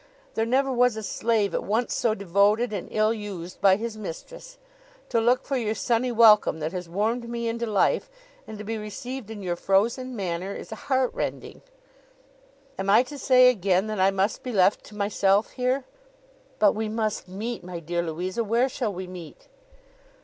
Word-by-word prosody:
There 225 0 0
never 265 +2 +2
was 250 -2 +3
a 220 - -5
slave 215 -1 0
at - - -1
once 225 +4 0
so 220 -2 +1
devoted 200 +4 +2
and 195 - -4
ill 215 +1 +2
used 195 -5 -7
by 195 -1 +6
his 220 +1 -5
mistress. - - -9 0.5
To 230 - +2
look 245 +3 +3
for 275 - -1
your 220 -3 -1
sunny 235 +4 0
welcome 215 -7 +5
that 155 +1 -3
has 180 -2 -6
warmed 225 +6 -1
me 235 0 -3
into 235 +1 -2
life, 215 - +1 0.4
and 220 - -8
to 210 - -7
be 220 +1 -4
received 240 +3 -7
in 210 -3 -7
your 175 -2 -1
frozen 235 +8 0
manner, 185 -1 -3
is - - -9
heart 260 +3 0
rending.' - - -5 1.2
'Am 195 +1 -2
I 215 +5 +6
to 285 +2 -9
say 255 -1 +6
again, 195 -3 +1
that 215 -2 -4
I 190 +1 +5
must 195 +2 0
be 255 - -5
left 195 -2 +3
to 210 - -13
myself 200 0 +1
here?' 255 +1 -1 0.7
'But 210 -2 +4
we 220 0 -3
must 215 -3 -2
meet, 215 +4 -5
my 175 -1 -6
dear 170 +1 -2
Louisa. 180 +6 -3
Where 235 +5 +1
shall 240 -4 -2
we 185 0 -6
meet? 180 -4 -11
215 Hz, 185 wpm, -25 LUFS, 195-235 Hz, 1.2 s, by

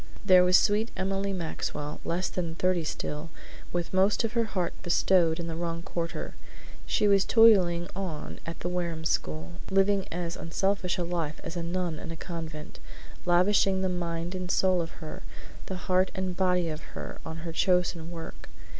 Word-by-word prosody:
There 185 -2 +7
was 180 0 +6
sweet 215 +3 +2
Emily 195 +1 -1
Maxwell, 160 -4 -4
less 180 +3 -1
than 170 -3 -3
thirty 180 -1 +1
still, 150 +1 -4 0.4
with 175 0 -2
most 195 +4 +3
of 225 - -1
her 235 -1 +2
heart 185 -5 -2
bestowed 175 -1 +3
in 170 - -3
the 165 -1 -4
wrong 170 0 -3
quarter. 170 -2 -4 0.5
She 210 - +2
was 200 -1 +5
toiling 185 -7 +5
on 180 -6 -5
at 165 - -7
the - - -2
Wareham 170 -3 -2
school, 80 - -2
living 195 0 +3
as 170 0 -3
unselfish 190 +2 0
a 180 - 0
life 170 -3 -2
as 165 - -6
a 170 - -2
nun 170 -2 -2
in - - -7
a 165 - -6
convent; 160 -3 -7 0.5
lavishing 190 +2 +3
the 190 - +1
mind 170 -1 -2
and 185 -1 -4
soul 185 -1 +3
of 165 - -4 0.2
her, 155 - -7 0.5
the 190 - -3
heart 185 +1 +2
and 185 -1 -2
body 180 -2 +2
of 155 0 -4 0.2
her, - - -6
on 160 0 -6
her 165 - -4
chosen 175 -2 +1
work. 165 -1 -8
175 Hz, 175 wpm, -28 LUFS, 165-190 Hz, 0.5 s, There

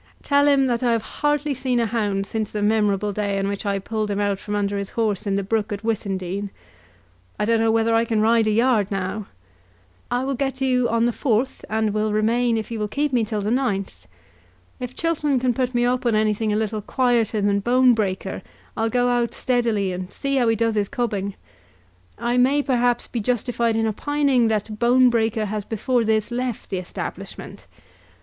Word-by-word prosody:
Tell 285 0 +3
him 280 -2 +4
that 240 -2 0
I 240 -2 +2
have 225 -2 0 0.2
hardly 295 0 +1
seen 255 -2 -1
a 230 - +2
hound 205 -3 -1
since 215 0 -3
the 210 -1 -3
memorable 210 -1 +1
day 200 -1 -1
on 195 0 -1
which 200 +1 -3
I 200 0 +1
pulled 215 +2 -3
him 200 0 -1
out 200 -1 0
from 210 0 -4
under 200 0 -1
his 200 - -5
horse 215 -3 -1
in 195 - +1
the 200 - 0
brook 215 +2 -1
at 205 +1 -4
Wissindine. 200 -3 -2 0.9
I - - +1
don't 230 +1 +2
know 225 0 +2
whether 225 0 +2
I 225 0 +4
can 225 -2 0
ride 225 +1 +3
a - - +3
yard 225 -2 +2
now. 195 +1 -3 0.8
I 245 +1 0
will 275 +1 -1
get 270 +1 -2
to 265 0 -2
you 250 -2 +2
on 230 +1 +2
the 240 - +2
4th, 250 +1 -1
and 220 -1 0
will 215 0 0
remain 230 +2 +2
if 220 +1 -5
you 225 - -3
will 210 - -1
keep 285 +5 -1
me 240 -2 +3
till 215 -1 -2
the 210 +2 -1
9th. 200 - -2 0.7
If 250 0 -6
Chiltern 300 -5 0
can 250 0 +1
put 255 +1 -1
me 240 0 +3
up 250 +1 0
on 230 - +2
anything 215 0 +1
a - - +1
little 215 0 -1
quieter 235 -2 +1
than 200 0 +2
Bonebreaker, 225 -6 +2 0.3
I'll 225 0 0
go 245 +2 +1
out 240 -1 0
steadily, 230 -6 +1
and 180 +1 -5
see 275 0 -2
how 245 -3 +2
he 225 - +3
does 230 +1 +1
his 205 -2 0
cubbing. 200 -5 -2 0.8
I 240 +2 -1
may, 275 +4 +3
perhaps, 245 -3 +1
be 240 - -4
justified 235 0 0
in 225 0 +1
opining 270 +2 +1
that 215 -1 -2
Bonebreaker 235 -2 +3
has 210 0 -3
before 235 +3 0
this 220 0 0
left 245 -3 -3
the 190 - -1
establishment. 180 - -7
225 Hz, 205 wpm, -22 LUFS, 210-245 Hz, 0.9 s, him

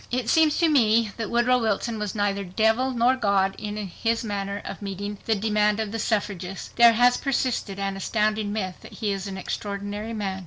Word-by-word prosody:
It 245 -2 -1
seems 315 -2 +4
to 340 - +3
me 230 -7 +3
that 225 -3 -3
Woodrow 240 +1 +3
Wilson 225 0 -1
was 210 -1 -3
neither 200 -1 0
devil 220 +7 +1
nor 250 0 +3
God 200 -5 +1
in 210 0 -5
his 225 +4 -2
manner 200 -2 -3
of - - -7
meeting 200 +1 -5
the 220 - +3
demand 210 0 +1
of 215 -2 -2
the 225 - -3
suffragists. 195 -4 -2
There 235 -1 +6
has 245 +2 +4
persisted 255 -7 -1
an 195 0 -2
astounding 215 +1 0
myth 190 -4 -3
that - - -13
he 210 -3 -2
is 195 0 -3
an 190 -1 -6
extraordinary 205 +3 -4
man. 195 -3 -3
210 Hz, 195 wpm, -25 LUFS, 200-230 Hz, -, There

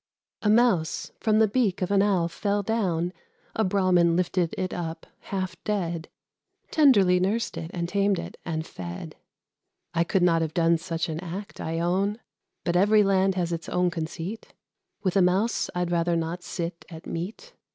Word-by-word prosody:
A 210 - +1
Mouse 215 -8 +2
from 215 -1 +2
the 220 0 +5
beak 205 -4 +1
of 185 - -2
an 200 -1 +4
owl 190 -4 +2
fell 200 +4 -1
down, 185 -5 0 0.4
A 220 - +2
Brahmin 185 -3 +3
lifted 175 -1 0
it 185 -1 -2
up, 165 -2 -5
half 185 -3 -4
dead: 175 -6 -2 0.6
Tenderly 205 - +5
nursed 205 +6 0
it, 165 - -5
and 170 -1 -2
tamed 200 +1 +2
it, - - -6
and 160 -2 -3
fed. 85 - -7 0.8
I 170 -1 +3
could 180 +2 +1
not 165 -2 +4
have 160 -1 -2
done 165 -1 +3
such 165 -1 -2
an 160 -1 -3
act, 185 +3 -7
I 165 +1 -2
own; 195 +5 0 0.4
But 175 - 0
every 210 +3 +5
land 195 -1 +2
has 175 -2 -1
its 165 -1 -5
own 180 0 +1
conceit: 165 +5 -5 0.5
With 185 -2 0
a 195 - +5
Mouse 190 +6 +2
I'd 180 -1 -1
rather 170 0 +2
not 165 +2 -2
sit 170 -1 -5
at 160 -2 -10
meat. 210 - -6
180 Hz, 170 wpm, -26 LUFS, 170-200 Hz, 0.8 s, the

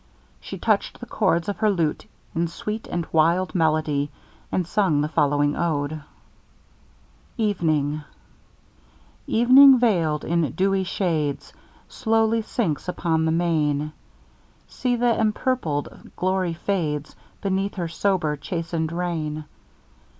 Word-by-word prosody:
She - - -8
touched - - 0
the - - -7
chords 170 -5 0
of 205 - -2
her 215 -1 +2
lute 165 -6 -1 0.3
in 170 +1 0
sweet 210 +6 -5
and 175 -1 -2
wild 170 +4 +2
melody, 155 -4 +1 0.4
and 180 - 0
sung 175 -5 +1
the 150 - 0
following 145 -1 +1
ode: 155 -2 -1 1.4
EVENING 155 -9 0 1.3
Evening 260 +3 +7
veil'd 170 -11 +1
in 165 -6 0
dewy 195 0 +1
shades, 155 -7 -2 0.3
Slowly 225 -1 +1
sinks 205 - -2
upon 165 -3 0
the 160 - +1
main; 155 -3 0 0.7
See 245 -2 -1
th'empurpled 225 - -1
glory 185 -2 0
fades, 160 -5 -2 0.3
Beneath 195 +1 -1
her 175 -3 -2
sober, 170 -3 0
chasten'd 165 +1 -3
reign. 160 -3 -3
170 Hz, 110 wpm, -23 LUFS, 155-200 Hz, 1.4 s, Evening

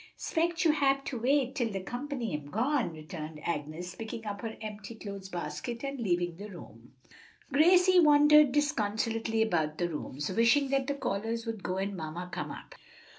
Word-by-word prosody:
"'Spect 340 +1 0
you 320 - +6
hab 275 -2 +2
to 250 - -3
wait 265 +1 +2
till 240 -5 0
de 195 - -3
comp'ny 245 - -4
am 150 -1 -6
gone," 245 - +1
returned 155 -1 -8
Agnes, 165 +2 -3
picking 225 +2 -7
up 200 -1 -4
her 225 -1 -5
empty 215 0 -7
clothes 200 -3 -7
basket 230 +7 -5
and 275 -1 -4
leaving 175 -5 0
the 205 +2 -8
room. 120 - -12 0.6
Gracie 360 +5 +6
wandered 300 -2 +7
disconsolately 225 -5 +1
about 160 -7 0
the 175 - 0
rooms, 150 -3 -4
wishing 230 +7 +4
that 270 -1 +1
the 285 - 0
callers 225 -2 -2
would 225 -3 -4
go 185 0 -2
and 195 +1 -2
mamma 170 +1 -5
come - - -3
up. - - -9
225 Hz, 175 wpm, -30 LUFS, 180-275 Hz, 0.6 s, wandered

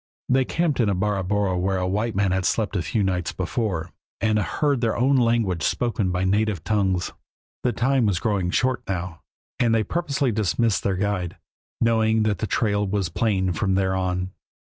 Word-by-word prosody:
They 130 0 +3
camped 165 -3 0
in 115 -4 +3
a 100 - +1
barabora 100 0 0
where 95 0 0
white 105 +5 -1
men 100 -1 +2
had 95 0 0
slept 105 +4 0
a 95 - +1
few 85 +7 -1
nights 90 -4 -1
before, 100 -9 -2 0.3
and 110 -1 +2
heard 140 +5 0
their 115 -2 0
own 130 +3 +3
language 115 -8 +2
spoken 110 +2 0
by 90 +1 -1
native 100 -2 +1
tongues. 95 -4 0 0.5
The 125 - +1
time 130 -1 +2
was 100 -4 +1
growing 95 -2 0
short 130 +6 +1
now, 90 -3 -4 0.4
and 115 -2 +3
they 110 - +2
purposely 140 - -1
dismissed 110 +1 +1
their 95 -2 0
guide, 95 -3 -2 0.4
knowing 110 -1 +3
that 105 -2 0
the 110 - -2
trail 105 -2 +1
was 95 -2 -1
plain 95 -1 0
from 95 +3 0
there 95 -1 +1
on. 90 0 -1
105 Hz, 180 wpm, -24 LUFS, 95-115 Hz, 0.5 s, They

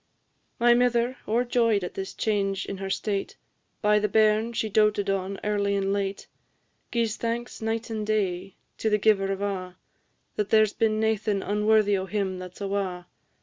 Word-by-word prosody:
My 240 0 +6
mither, 245 +1 +2
o'erjoy'd 230 -2 +2
at 180 - -5
this 195 0 -6
change 195 -2 0
in 195 - -5
her 195 0 -5
state, 200 0 -2 0.5
By 210 0 +4
the 210 - +1
bairn 215 +2 +3
she 225 -1 -1
doated 210 -1 +2
on 195 0 -2
early 200 -1 0
and 195 0 0
late, 200 -1 -2 0.7
Gi'es 230 -2 0
thanks 235 +1 -3
night 225 +1 -2
and 215 -1 -2
day 195 -3 -1 0.2
to 220 - +1
the 210 - +3
Giver 195 -2 +2
of 195 +1 -3
a', 185 -2 -4 0.6
There 215 +1 +4
's 210 - -6
been 215 -1 +1
naething 215 -2 0
unworthy 210 0 +3
o' 190 - -5
him 190 -2 -2
that 180 -1 -9
's - - -13
awa'! 195 -3 -2
210 Hz, 170 wpm, -26 LUFS, 195-220 Hz, 0.7 s, My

